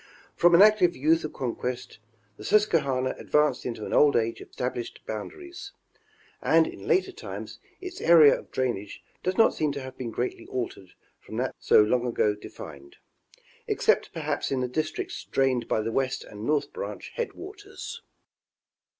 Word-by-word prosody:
From 175 0 +5
an 185 - +9
active 210 -5 +5
youth 155 +5 +2
of 155 - -4
conquest, 125 -2 -4 0.4
the - - -11
Susquehanna 145 -11 +2
advanced 150 -2 +1
into 115 -3 -5
an - - -5
old 145 -1 +5
age 115 0 0
of - - -11
estab 125 +1 -3
lished 120 -1 -7
boundaries; 355 - -7 0.7
and - - +4
in - - -8
later 385 +1 +2
times, 410 +4 -8 0.2
its 370 -1 -7
area 160 -3 +7
of - - -15
drainage 120 -6 -3 0.2
does 185 +1 -1
not 225 - +5
seem 150 -2 0
to 140 - -5
have 130 0 -8
been 125 -2 -3
greatly 120 +3 -4
altered 115 -7 -5 0.3
from - - -9
that - - -1
so - - +6
long 120 +3 +1
ago 105 -3 +2
defined; 70 -8 -11 0.7
except - - +2
perhaps - - -2
in 130 -1 0
the 125 - 0
districts 155 +5 -3
drained 130 -3 +1
by 110 - +1
the 115 +1 -2
West 130 +1 -1
and 105 +2 -8
North 150 -1 0
Branch 485 +2 -6
headwaters. 410 -3 -7
135 Hz, 165 wpm, -27 LUFS, 120-175 Hz, 0.7 s, an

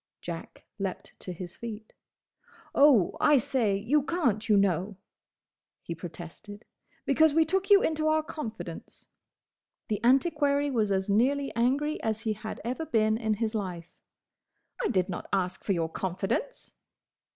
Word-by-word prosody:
Jack 170 -1 -8
leapt 195 -2 -4
to 185 - -6
his 175 0 -8
feet. 220 -2 -8 0.8
"Oh, 275 -10 +5
I 295 -1 +6
say, 255 -6 +1
you 250 +9 +2
can't, 260 - 0
you 210 - +6
know!" 195 0 +1 0.9
he 170 - -4
protested, 175 +5 -10 0.4
"because 310 +2 +4
we 325 0 +5
took 385 +4 0
you 405 -1 +7
into 310 -1 0
our 310 0 +2
confidence!" 300 -8 -8 0.8
The 210 0 -2
antiquary 285 +2 +3
was 220 -5 +1
as 190 -1 0
nearly 270 +7 +1
angry 275 +6 +1
as 220 -1 -2
he 220 -1 -1
had 215 +1 -7
ever 260 +7 -3
been 220 -5 +2
in 220 -1 0
his 220 +1 -2
life. 180 -6 -5 0.9
"I - - +2
did 185 -4 +1
not 180 - -6
ask 185 -1 -1
for 200 - +1
your 165 -3 0
confidence!" 190 - -3
220 Hz, 145 wpm, -28 LUFS, 195-285 Hz, 0.9 s, you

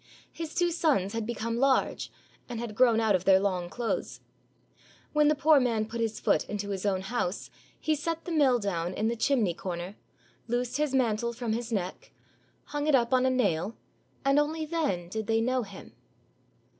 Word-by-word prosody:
His 325 -2 -7
two 350 -1 +2
sons 285 - +1
had 225 -1 -3
become 230 0 -2
large, 270 +1 +1 0.4
and 240 -2 -4
had 235 -2 -5
grown 235 0 +4
out 220 -2 +3
of 185 -2 +1
their 190 -1 +6
long 185 -3 -1
clothes. 235 +4 -3 0.9
When 300 0 +4
the 305 - +4
poor 300 +1 +5
man 230 -4 +1
put 230 +2 -5
his 225 -1 -1
foot - - +2
into 205 -1 -3
his 195 0 -2
own 190 -2 +1
house, 195 -2 -3 0.3
he 315 - +1
set 330 +2 -3
the 350 - -5
mill 280 -6 +4
down 180 -4 -2
in 220 +1 0
the 235 - -1
chimney 225 -6 +2
corner, 175 +2 -5 0.5
loosed 245 +2 -1
his 295 -3 0
mantle 235 -2 +1
from 235 -2 -2
his 235 +1 -3
neck, 190 -4 -3 0.5
hung 290 0 -3
it 300 - +5
up 240 0 +2
on 255 0 +4
a - - +4
nail, 210 -5 0 0.5
and 275 +1 +4
only 310 +2 -1
then 295 - -1
did 220 +3 -4
they 225 0 +2
know 255 +2 +1
him. 200 -4 -10
235 Hz, 190 wpm, -28 LUFS, 205-275 Hz, 0.9 s, their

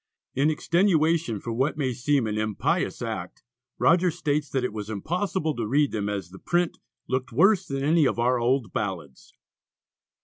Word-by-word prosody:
In 140 +4 +2
extenuation 165 - +2
for 115 +3 -5
what 130 +6 0
may 130 -4 0
seem 135 +1 +1
an 105 -1 -2
impious 110 -1 -1
act, - - -5 0.3
Rogers 175 -1 +3
states 150 -2 -1
that 130 -2 -1
it 125 - -2
was 105 -1 -6
impossible 160 - -2
to 115 -3 -3
read 145 +4 +2
them 105 -2 -2
as 100 -4 -4
the 95 - -11
print 175 -1 0 0.3
"looked 130 +2 -2
worse 195 -1 +4
than 135 0 -3
any 155 0 +4
of - - -1
our 125 +1 +2
old 120 -1 0
ballads." 85 -10 -5
135 Hz, 170 wpm, -26 LUFS, 110-160 Hz, 0.3 s, worse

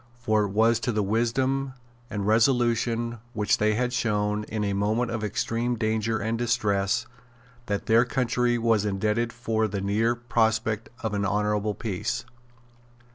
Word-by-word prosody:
For 110 -3 +1
it - - -3
was 110 +3 +3
to 120 - -1
the 105 -2 0
wisdom 130 +6 0 0.4
and 100 -2 -3
resolution 115 0 +2
which 105 -2 +1
they 105 0 +2
had 125 +2 -1
shown, 105 -3 0
in 110 -1 -3
a 100 -1 0
moment 110 +4 0
of 115 -2 -3
extreme 115 +3 -1
danger 110 0 0
and 110 +2 -2
distress, 105 -5 +1 0.6
that 100 -1 -2
their 115 +1 +5
country 125 -1 0
was 115 -3 +2
indebted 105 +3 0
for 110 -2 -1
the 100 -1 -3
near 105 +5 +1
prospect 115 -2 0
of 110 -2 -2
an 100 0 0
honourable 105 +1 0
peace. 115 +2 -3
110 Hz, 150 wpm, -26 LUFS, 105-120 Hz, 0.6 s, their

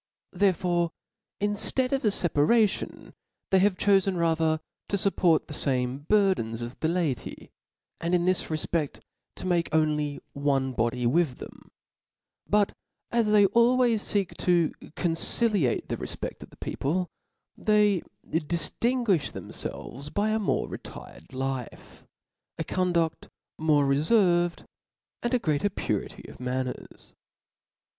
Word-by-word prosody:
Therefore 175 -3 +2 0.5
inftead 205 +5 +1
of 270 -1 0
a - - +3
fc 190 -4 +1
paration, 210 +9 +1 0.4
they 190 - +5
have 190 -1 +3
chofe 195 -2 +3
rather 160 -1 +2 0.3
to - - +1
fupport 180 -4 +2
the - - -9
fame 130 0 -1
burthens 190 - +2
as 120 +1 -5
the 160 - -2
laity, 160 -8 -2 0.5
and 170 +2 +1
in 175 -1 +1
this 185 -1 +2
refped 155 -1 -2 0.3
to - - -7
make 175 -2 +1
only 150 -2 +1
one 135 -2 0
body 120 +1 0
with 135 +1 +2
them: - - -12 0.8
but 205 -1 +2 0.4
as 235 -2 +2
they 210 -1 +6
always 235 +2 +3
feek 200 -3 0
to 175 -3 +3
* - - -48
conciliate 175 - +2
the - - -3
refpeft - - -5
of - - -10
the - - -19
people, 175 +6 -2 0.4
they 210 -4 +3 0.3
diftinguifli 175 - 0
thcmfelves 140 +4 -6
by 210 +1 +1
a 220 - +1
more 210 - 0
retired - - -10
life, 130 -2 -5 0.5
a - - -2
conduft 175 -3 0 0.3
more 150 -2 +3
referved, 175 +4 +2 0.6
and 240 +1 0
a - - +5
greater 160 -3 0
purity - - -4
of - - -12
manners. 125 0 -5
175 Hz, 130 wpm, -27 LUFS, 145-205 Hz, 0.8 s, they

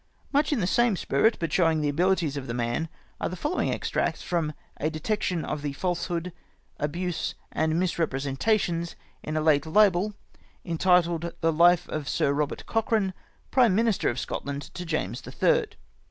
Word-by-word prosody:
Much 290 +3 +3
m 285 - +1
the 185 - +1
same 240 +2 +3
spirit, 220 +4 +2
but 165 -3 -2
showing 165 -3 +3
the 150 - 0
abilities 170 -1 +1
of 140 -2 -5
the 115 - -3
man, 120 +7 -1 0.3
are - - -1
the 180 - -5
following 300 - -1
extracts - - -1
from 165 -4 -1
" - - -32
A 155 - +1
Detection 175 +2 -1
of 150 - -3
the 145 -1 -3
Falsehood, 175 +1 -2 0.5
Abuse, 170 +4 -2 0.2
and 160 0 0
INIisrepresentations 170 +2 0 0.3
in 155 0 -3
a - - +1
late 155 -1 +3
Libel, 205 +2 +3 0.5
entitled. 170 -1 +2
The 165 0 +2
Life 175 +2 +5
of 150 -2 -4
Sir 140 - +1
Eobert 150 0 -2
Cochrane, 220 -4 +1 0.4
Prime 235 -7 +4
IMinister 225 -3 +2
in 120 - -2
Scotland 140 +3 -4
to 180 - -6
James 160 -2 -2
the - - -9
Third." 475 -3 +2
170 Hz, 170 wpm, -27 LUFS, 155-190 Hz, 0.5 s, Life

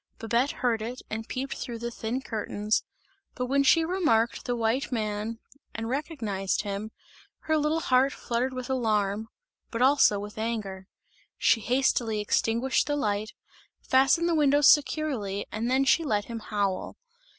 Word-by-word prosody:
Babette 235 +4 +1
heard 235 -5 -1
it 240 +4 -6
and 225 +1 -4
peeped 270 +2 -4
through 235 -2 -5
the 235 +1 -4
thin 235 +3 -4
curtains, 210 -2 -1 0.5
but 250 - -2
when 275 +2 +2
she 325 +4 +4
remarked 315 -11 +1
the 245 - -1
white 235 +4 0
man 215 -1 -2 0.4
and 225 +1 -4
recognized 230 - -2
him, 205 +1 -4 0.5
her 315 - 0
little 305 +2 +1
heart 260 0 +3
fluttered 245 +1 -2
with 255 -1 -5
alarm, 220 -4 0 0.4
but 230 - -4
also 265 -6 +5
with 205 +1 -8
anger. 205 -4 -4 0.5
She 225 - +3
hastily 240 -2 +1
extinguished 230 +4 +1
the 290 - 0
light, 210 -5 -1 0.5
fastened 270 +6 +3
the 340 - +1
windows 290 -2 +4
securely 270 -10 +2
and 225 +3 -2
then 265 +2 +2
she 330 +5 +4
let 210 -8 0
him 230 -1 -6
howl. 205 -3 -2
235 Hz, 150 wpm, -27 LUFS, 215-270 Hz, 0.5 s, also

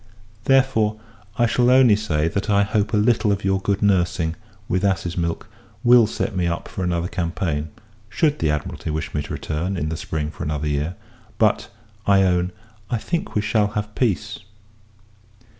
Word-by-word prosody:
Therefore, 125 -6 +3 0.4
I 120 - +4
shall 120 +1 +2
only 130 -4 +6
say, 80 -8 0
that 100 +5 -2
I 100 0 +4
hope 105 0 0
a 110 - +2
little 110 0 +3
of 100 0 -1
your 95 0 +1
good 100 +1 0
nursing, 90 -4 +1 0.3
with 90 +1 0
ass's 90 -3 0
milk, 85 -1 -2 0.4
will 120 -2 +7
set 110 -1 -3
me 90 -2 +1
up 85 0 -3
for 95 - -5
another 85 -1 0
campaign; 85 -4 -2 0.4
should 150 +6 +1
the 80 - +1
Admiralty 75 +1 -3
wish 75 -2 -3
me 75 - 0
to - - -7
return, 85 +5 -3
in 75 -2 -2
the 80 - -2
spring, 75 -1 -3
for - - -12
another 75 0 -2
year: 75 +4 -1 0.4
but, 110 -2 +2 0.4
I 100 -1 +5
own, 90 -1 +1 0.4
I 120 - 0
think 170 +9 -3
we 105 - +2
shall 105 0 +2
have 105 0 -3
peace. 110 -8 -1
95 Hz, 175 wpm, -22 LUFS, 85-110 Hz, 0.4 s, will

